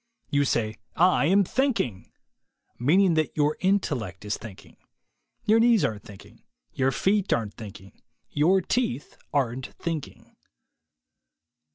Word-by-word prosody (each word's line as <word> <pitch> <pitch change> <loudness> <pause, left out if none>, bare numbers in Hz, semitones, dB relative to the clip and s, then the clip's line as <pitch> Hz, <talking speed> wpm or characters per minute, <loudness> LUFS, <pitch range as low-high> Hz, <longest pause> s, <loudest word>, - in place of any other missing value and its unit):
You 145 0 +2
say, 110 -4 -1 0.2
"I 180 -3 +4
am 200 +3 +4
thinking," 195 - -1 0.4
— - - -46
meaning 175 +8 +4
that 155 -1 -1
your 150 0 +2
intellect 130 - -1
is 105 - -1
thinking. 110 -4 -12 0.7
Your 220 +2 +4
knees 230 -3 +4
aren't 105 -2 -3
thinking; 100 -2 -14 0.3
your 135 0 +1
feet 195 +8 +1
aren't 110 -3 0
thinking; 100 -3 -12 0.3
your 180 +6 +3
teeth 170 - -2 0.2
aren't 130 -2 -1
thinking. 165 -4 -6
145 Hz, 125 wpm, -26 LUFS, 115-190 Hz, 0.7 s, I